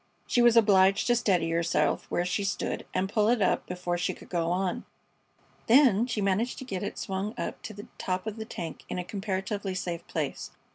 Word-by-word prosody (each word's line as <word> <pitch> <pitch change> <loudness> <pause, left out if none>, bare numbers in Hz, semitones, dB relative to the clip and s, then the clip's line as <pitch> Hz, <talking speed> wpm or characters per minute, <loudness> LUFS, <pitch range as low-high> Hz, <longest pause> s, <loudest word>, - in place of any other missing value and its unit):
She 245 - +2
was 240 -1 +6
obliged 195 -3 +5
to 240 - +3
steady 180 -8 +1
herself 170 0 +1
where 175 - 0
she 185 +3 -1
stood 195 - -2
and 190 - 0
pull 210 +1 +2
it 240 0 +3
up 195 - +1
before 180 -1 -2
she - - -1
could - - -15
go 170 -2 0
on. 180 +1 -1 0.8
Then 240 -3 +5
she 225 -4 -2
managed 200 +5 0
to 260 - -7
get 190 -7 -4
it 205 - -4
swung 195 +3 -3
up - - -4
to 220 - -7
the 205 - -9
top 185 +1 -2
of 220 0 -4
the 220 - -5
tank 165 -7 -6
in - - -3
a 180 - -2
comparatively 195 0 -3
safe 175 -2 -4
place. - - -3
195 Hz, 205 wpm, -28 LUFS, 180-220 Hz, 0.8 s, was